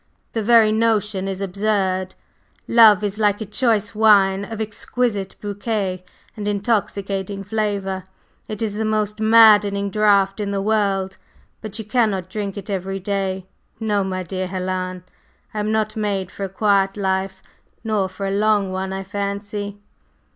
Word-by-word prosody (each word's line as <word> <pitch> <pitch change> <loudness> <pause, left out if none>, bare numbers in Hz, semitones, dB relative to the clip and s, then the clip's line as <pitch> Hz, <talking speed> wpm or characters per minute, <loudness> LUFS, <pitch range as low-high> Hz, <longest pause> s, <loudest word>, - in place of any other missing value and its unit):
The 225 - -1
very 220 0 +5
notion 215 -3 +1
is 195 0 -4
absurd. 190 -1 -1 0.5
Love 220 -3 +6
is 205 +1 -2
like 205 -1 +2
a 220 - -4
choice 210 -1 0
wine 200 -3 +4
of 220 +2 -7
exquisite 215 -1 -2
bouquet 205 -3 -3 0.3
and 205 -1 -5
intoxicating 200 -2 -1
flavor; 200 -3 -2 0.4
it 215 +1 -4
is 215 -2 -1
the 220 - -1
most 215 -1 -1
maddening 210 -3 +5
draught 200 -1 +3
in 205 -1 -2
the 200 -1 -1
world, 195 -2 0 0.4
but 215 -1 -6
you 220 - -6
cannot 210 -5 0
drink 205 -1 -4
it 200 - -7
every 195 -1 -3
day. 190 -1 -2 0.3
No, 210 -3 0
my 185 -1 -3
dear 185 +1 -3
Helen; 185 -1 -3 0.5
I 215 - -3
am 210 +1 -1
not 215 0 0
made 200 -3 -2
for 200 - -5
a - - -6
quiet 195 0 +1
life, 190 -1 -1 0.4
nor 210 -4 0
for 195 +1 -6
a 195 - -1
long 205 -1 +2
one, 190 0 -3
I 190 0 -4
fancy." 205 +1 -4
200 Hz, 155 wpm, -21 LUFS, 195-215 Hz, 0.5 s, Love